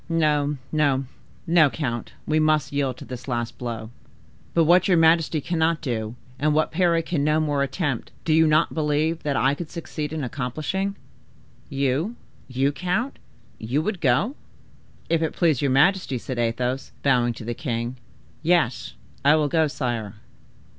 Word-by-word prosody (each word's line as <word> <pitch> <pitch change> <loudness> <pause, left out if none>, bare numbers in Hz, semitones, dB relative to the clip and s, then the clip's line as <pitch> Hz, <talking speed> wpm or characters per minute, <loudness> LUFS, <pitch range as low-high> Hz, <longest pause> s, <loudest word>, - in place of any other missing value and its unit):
No, 150 -3 +1
no, 140 -3 +2 0.4
no, 165 -3 +5
count, 125 -6 -4
we 155 0 +2
must 155 -1 +2
yield 135 -3 0
to - - -10
this 125 0 -8
last 120 -2 -3
blow." 115 -2 -5 0.6
"But 165 - +5
what 175 +3 +5
your 180 -3 +4
majesty 165 -1 +4
cannot 165 0 +1
do, 115 -5 -3 0.2
and 150 +1 +2
what 155 - +2
Parry 170 -1 +2
can 155 -5 -1
no 150 +1 +3
more 145 -3 0
attempt, 140 -2 -2 0.2
do 160 - +2
you 160 0 +5
not 155 0 +3
believe 155 +1 0
that 145 -2 -1
I 135 +1 +3
could 155 +2 -6
succeed 155 -3 -5
in 160 -2 -3
accomplishing?" 155 +10 -2 0.7
"You—you, 135 - -2
count—you 180 - -3
would 195 -2 -3
go?" 150 - +2 0.7
"If 165 -1 +1
it 160 - -1
please 160 -7 +2
your 140 - +2
majesty," 140 +1 +3
said 125 +1 -5
Athos, 125 +3 -1
bowing 125 -3 +3
to 115 - -9
the 120 - -2
king, 120 -2 -3 0.5
"yes, 150 - +1 0.3
I 145 +2 +6
will 150 -2 +1
go, 160 -1 +3
sire." 120 -7 -3
150 Hz, 155 wpm, -24 LUFS, 130-165 Hz, 0.7 s, I